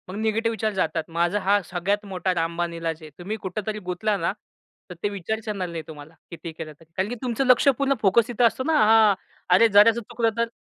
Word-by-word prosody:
मग 185 - -6
निगेटिव्ह 220 +1 0
विचार 220 -1 -1
जातात. 175 -4 -1
माझा 170 +4 0
हा 200 +1 +2
सगळ्यात 190 +4 -2
मोठा 185 -1 -2
रामबाण 170 0 -2
इलाज 165 -1 -4
आहे. 155 - -10
तुम्ही 200 +5 -4
कुठेतरी 210 +3 -4
गुंतला 185 +3 -2
ना, 170 -1 -1 0.6
तर 180 - -8
ते 205 - +1
विचारच 210 +3 -4
येणार 200 -4 -3
नाही 165 -1 -6
तुम्हाला, 150 0 -11 0.2
किती 165 0 -7
केलं 155 -1 -8
तरी. 165 0 -21
कारण 190 +2 0
की 245 - -4
तुमचं 250 +1 -1
लक्ष्य 255 +2 +5
पूर्ण 275 0 +2
फोकस 220 +4 +3
इथे 240 0 0
असतो 235 +2 +2
ना. 320 - 0
हां. 220 -1 +6 0.4
अरे, 230 +5 +6
जराचं 220 +2 +5
चुकलं 230 0 -1
तर? 235 0 +1
200 Hz, 215 wpm, -24 LUFS, 175-220 Hz, 0.6 s, हां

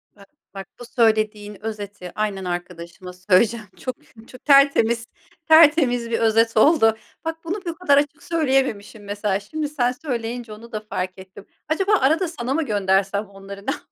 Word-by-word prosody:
Bak 200 -1 -18 0.2
bak 195 0 -8
bu 245 - -9
söylediğin 215 -3 0
özeti 205 -4 -6
aynen 200 -3 -2
arkadaşıma 175 0 -6
söyleyeceğim 210 +5 +2
çok, 255 -2 -5 0.3
çok 255 - -15
tertemiz, 275 -5 +4 0.4
tertemiz 295 -7 +5
bir 230 - 0
özet 225 0 +2
oldu. 225 -4 +5 0.3
Bak, 325 0 -3
bunu 340 +3 -3
bu - - -2
o 335 - -5
kadar 320 -5 +3
açık 290 0 0
söyleyememişim 265 -10 -1
mesela, 205 -1 -2
şimdi 295 +9 -5
sen 250 -5 0
söyleyince 240 -4 -5
onu 230 +2 -13
da 215 - -3
fark 185 +1 -3
ettim. 190 +1 -13 0.2
Acaba 385 +6 0
arada 320 +7 +2
sana 265 -6 -4
mı 325 +3 0
göndersem 200 -1 +1
onları 200 0 -11
ne - - +2
yapsak? - - -6
225 Hz, 165 wpm, -22 LUFS, 200-275 Hz, 0.4 s, tertemiz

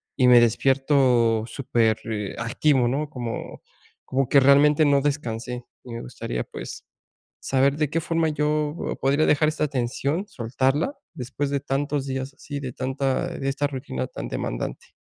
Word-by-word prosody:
y 125 -2 +4
me 120 -1 +9
despierto 125 -2 +3
súper, 115 -3 +1
eh, 105 -3 -3
activo, 125 +2 +2
¿no? 145 +4 -1
Como 120 -5 -6 0.4
como 135 -1 0
que 140 - +6
realmente 145 +3 +5
no 140 -1 +4
descansé. 125 -4 -3 0.2
Y 120 - -9
me 115 - -5
gustaría, - - -4
pues, - - -8 0.6
saber 135 +2 +2
de 150 -2 0
qué 165 +2 -1
forma 165 0 0
yo 150 +1 -1
podría 140 +3 +3
dejar 150 +1 +3
esta 150 0 -1
tensión, 140 - -2
soltarla, 135 - 0 0.2
después 135 +3 -3
de 140 -1 0
tantos 140 0 -1
días 135 0 -4
así, 145 0 -6
de 130 -2 -5
tanta 135 +6 -1
eh, - - -7
de 135 - -1
esta 145 +1 -1
rutina 125 - -4
tan - - -7
demandante. - - -5
135 Hz, 160 wpm, -24 LUFS, 125-145 Hz, 0.6 s, me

